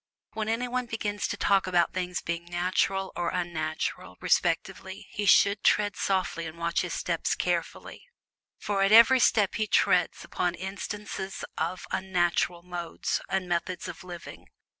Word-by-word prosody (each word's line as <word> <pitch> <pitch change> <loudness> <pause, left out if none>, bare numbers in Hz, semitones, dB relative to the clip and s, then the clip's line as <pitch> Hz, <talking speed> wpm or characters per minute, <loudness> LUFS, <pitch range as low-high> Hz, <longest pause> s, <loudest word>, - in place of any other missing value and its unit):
When 220 0 -2
anyone 245 +2 -1
begins 210 -3 -2
to 205 - -4
talk 195 -1 +2
about 175 -2 +2
things 180 -1 -3
being 170 0 -3
"natural" 185 +2 0
or 175 -1 -1
"unnatural," 160 -3 -3
respectively, - - 0
he 205 - -3
should 200 +1 +5
tread 205 -2 +3
softly 185 -3 -1
and 160 +1 -9
watch 170 +1 0
his - - -3
steps - - -1
carefully. - - -3 0.5
For 200 -1 -1
at 195 +1 +3
every 230 +4 +8
step 210 -5 +3
he 215 -1 -1
treads - - +2
upon 175 -1 -1
instances 195 +1 -5
of 175 +3 -3
"unnatural" 175 -2 0
modes 175 -1 -3
and 190 -1 -1
methods 175 +1 -2
of - - -8
living. 175 -2 -10
185 Hz, 145 wpm, -28 LUFS, 175-205 Hz, 0.5 s, every